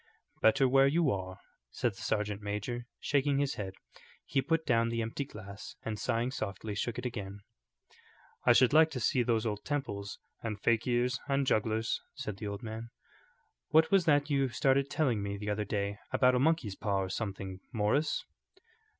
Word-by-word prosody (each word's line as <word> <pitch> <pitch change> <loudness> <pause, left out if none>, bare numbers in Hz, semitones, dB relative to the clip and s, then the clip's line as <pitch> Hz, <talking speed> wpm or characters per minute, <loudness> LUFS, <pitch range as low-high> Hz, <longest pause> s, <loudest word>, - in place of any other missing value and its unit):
"Better 135 +5 +5
where 135 +1 +5
you 155 0 +3
are," 95 -1 -4 0.3
said 120 - -1
the 95 - -13
sergeant 105 -1 -1
major, 105 +4 -4
shaking 140 -1 +1
his 140 -1 +1
head. 95 -2 -5 0.5
He 135 - +1
put 160 +3 0
down 115 -1 +3
the 115 0 -1
empty 115 +5 -3
glass, 100 -5 -10
and 110 -2 -4
sighing 120 +3 0
softly, 105 -3 -4
shook 110 +3 -2
it 125 - -5
again. 100 -4 -5 1.0
"I - - +6
should 130 +1 +5
like 160 +1 +7
to 125 - -2
see 125 +2 +2
those 115 -1 +1
old 105 -2 -2
temples 100 -9 -3 0.2
and 110 -3 -4
fakirs 120 +3 +1
and 140 -1 +1
jugglers," 110 -1 +1
said 105 -2 -5
the 105 - -5
old 100 +1 -5
man. 115 +1 -6 0.8
"What 160 +1 +5
was 195 -3 +4
that 145 -2 +4
you 135 -3 +1
started 135 +2 +2
telling 130 -8 +1
me 100 0 -3
the 105 +1 -3
other 105 +1 -1
day 100 0 -2
about 125 -1 +4
a 125 - +3
monkey's 140 -8 +1
paw 100 -2 0
or 95 - -4
something, 95 -2 -4
Morris?" 115 +6 +1
115 Hz, 175 wpm, -31 LUFS, 105-135 Hz, 1.0 s, like